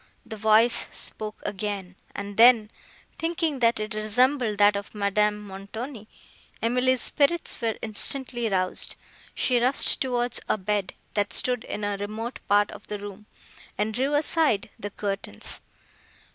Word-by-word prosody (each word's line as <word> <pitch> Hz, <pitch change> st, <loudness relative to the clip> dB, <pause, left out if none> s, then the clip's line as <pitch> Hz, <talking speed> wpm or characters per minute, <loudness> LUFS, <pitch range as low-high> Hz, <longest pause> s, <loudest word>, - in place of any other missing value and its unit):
The 220 Hz, -, -7 dB
voice 220 Hz, +2 st, +3 dB
spoke 215 Hz, -1 st, -4 dB
again; 200 Hz, -2 st, -4 dB, 0.2 s
and, 200 Hz, 0 st, -6 dB
then, 230 Hz, -1 st, +6 dB, 0.5 s
thinking 330 Hz, -3 st, -1 dB
that 230 Hz, -2 st, +3 dB
it 215 Hz, 0 st, -4 dB
resembled 220 Hz, +2 st, +1 dB
that 205 Hz, 0 st, +5 dB
of 200 Hz, +1 st, -6 dB
Madame 210 Hz, +1 st, +1 dB
Montoni, 210 Hz, +4 st, -8 dB, 0.5 s
Emily's 250 Hz, +2 st, +1 dB
spirits 310 Hz, +1 st, +1 dB
were 225 Hz, -2 st, -1 dB
instantly 240 Hz, +2 st, +2 dB
roused; 185 Hz, -2 st, 0 dB, 0.4 s
she 250 Hz, -2 st, +2 dB
rushed 255 Hz, +3 st, +3 dB
towards 245 Hz, -2 st, 0 dB
a -, -, +2 dB
bed, 205 Hz, -1 st, -2 dB, 0.2 s
that 205 Hz, -1 st, -1 dB
stood 250 Hz, -2 st, +3 dB
in 210 Hz, -, -5 dB
a 205 Hz, -1 st, -1 dB
remote 215 Hz, +4 st, -5 dB
part 205 Hz, 0 st, +3 dB
of -, -, -12 dB
the 210 Hz, -, -4 dB
room, 205 Hz, +1 st, -10 dB, 0.5 s
and 215 Hz, +1 st, -1 dB
drew 270 Hz, +5 st, 0 dB
aside 290 Hz, -9 st, +2 dB
the 205 Hz, -, -5 dB
curtains. 195 Hz, -, -5 dB
215 Hz, 140 wpm, -26 LUFS, 205-245 Hz, 0.5 s, then